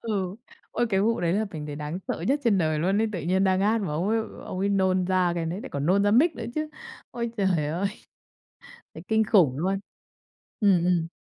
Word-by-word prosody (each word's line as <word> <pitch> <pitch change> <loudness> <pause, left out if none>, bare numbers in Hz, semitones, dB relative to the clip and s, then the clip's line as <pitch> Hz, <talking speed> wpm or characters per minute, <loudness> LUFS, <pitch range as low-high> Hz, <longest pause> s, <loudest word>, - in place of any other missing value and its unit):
Ừ. 195 -4 -2 0.3
Ôi, 240 - 0
cái 195 -1 +2
vụ 230 +1 +1
đấy 170 -1 +1
là 210 +4 +1
mình 155 -5 -6
thấy 145 -1 -6
đáng 150 +4 -4
sợ - - -2
nhất 280 +2 +2
trên 215 -5 +3
đời 155 -3 +1
luôn 190 +5 +1
ấy, 225 - +1
tự 180 - -3
nhiên 185 +4 +1
đang 190 -1 +2
hát 215 +3 +2
mà 195 - -2
ông 170 +6 -1
ấy 225 +1 +2 0.3
ông 185 - -5
ấy 195 +2 +1
nôn 190 -2 +2
ra 185 -1 +2
cái 165 -1 -2
đấy, 175 +5 -3
lại 265 - -7
còn 140 0 -2
nôn 195 +3 +3
ra 205 - +3
mic 295 +10 +4
nữa - - -5
chứ. 310 0 -2 0.4
Ôi 235 -1 -3
trời 185 -7 +1
ơi! 170 +6 -1 1.1
Thấy 160 - -9
kinh 220 0 +3
khủng 170 - +3
luôn! 190 +4 0 0.8
Ừm, 190 -5 +4
ừm. 175 -2 +1
190 Hz, 235 wpm, -26 LUFS, 170-210 Hz, 1.1 s, mic